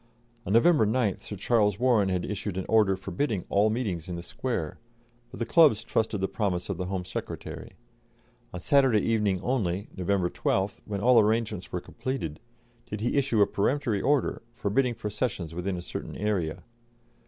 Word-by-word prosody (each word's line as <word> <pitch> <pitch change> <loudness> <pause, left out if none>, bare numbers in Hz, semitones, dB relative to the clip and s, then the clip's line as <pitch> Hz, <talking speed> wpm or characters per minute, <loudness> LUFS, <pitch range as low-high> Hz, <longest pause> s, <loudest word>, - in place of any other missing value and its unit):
On 100 - 0
November 115 0 +5
9th 110 -3 0
Sir 105 - -7
Charles 105 -1 +2
Warren 115 -5 +3
had 90 -1 -1
issued 100 -2 -4
an 95 - -2
order 105 -4 +4
forbidding 100 +2 -2
all 105 +2 +3
meetings 100 -8 -2
in 90 - -3
the 85 - -6
Square, 95 -6 -3 0.5
but - - -10
the 115 - 0
clubs 135 -5 +5
trusted 110 -2 0
the 95 - +1
promise 95 -5 -2
of 100 - -2
the 90 - -3
Home 95 -1 -3
Secretary. - - -6 0.8
On 90 - -6
Saturday 130 -1 +4
evening 105 -4 +1
only, 100 -6 -1
November 95 -1 0
12th, 95 +1 -1
when 100 -2 -4
all 120 0 +6
arrangements 110 -3 0
were 90 - -2
completed, 85 - -5 0.5
did 105 0 -4
he 120 - 0
issue 130 -7 +3
a - - +4
peremptory 110 -1 0
order, 145 -2 +1
forbidding 120 +2 +1
processions 105 -6 -3
within 90 +2 -2
a 85 - -6
certain - - -6
area. 95 -6 -1
105 Hz, 170 wpm, -27 LUFS, 95-115 Hz, 0.8 s, all